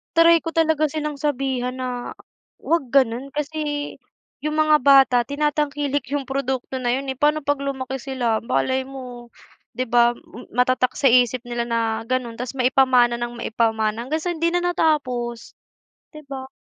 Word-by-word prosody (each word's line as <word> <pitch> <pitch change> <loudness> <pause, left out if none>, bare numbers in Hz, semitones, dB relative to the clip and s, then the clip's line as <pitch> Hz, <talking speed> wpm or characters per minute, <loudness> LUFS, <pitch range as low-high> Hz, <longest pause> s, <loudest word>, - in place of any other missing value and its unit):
try 335 0 +6
ko 330 0 -6
talaga 320 -2 +2
silang 300 -1 -4
sabihan 265 -3 -1
na, 250 -1 -5 0.4
'wag 330 -6 -1
gano'n 255 0 +2
kasi 300 +1 -3 0.8
yung 305 +1 -3
mga 310 -1 +4
bata 270 -2 +6
tinatangkilik 290 -1 -1
yung 285 - -1
produkto 265 -1 -3
na 245 -1 0
yun, 270 0 -3
eh. 265 - -8
Pa'no 300 +1 +2
'pag 285 0 0
lumaki 265 -1 -4
sila, 245 -4 -1
malay 260 - -1
mo, 250 -3 -9 0.5
'di 255 - -1
ba 240 -1 +3 0.4
matatak 255 0 +2
sa 270 -3 +3
isip 245 0 +3
nila 240 -1 -3
na 225 -1 -1
gano'n. 245 -2 -2
Tas 250 +1 -5
maipamana 255 -2 +3
ng 240 0 -4
maipamana 225 -1 0
hanggang 315 +3 -2
sa 355 - -1
hindi 335 0 0
na 350 +1 0
natapos, 265 -9 -1 0.6
'di 305 - -10
ba? 270 -2 -7
265 Hz, 155 wpm, -22 LUFS, 245-295 Hz, 0.8 s, try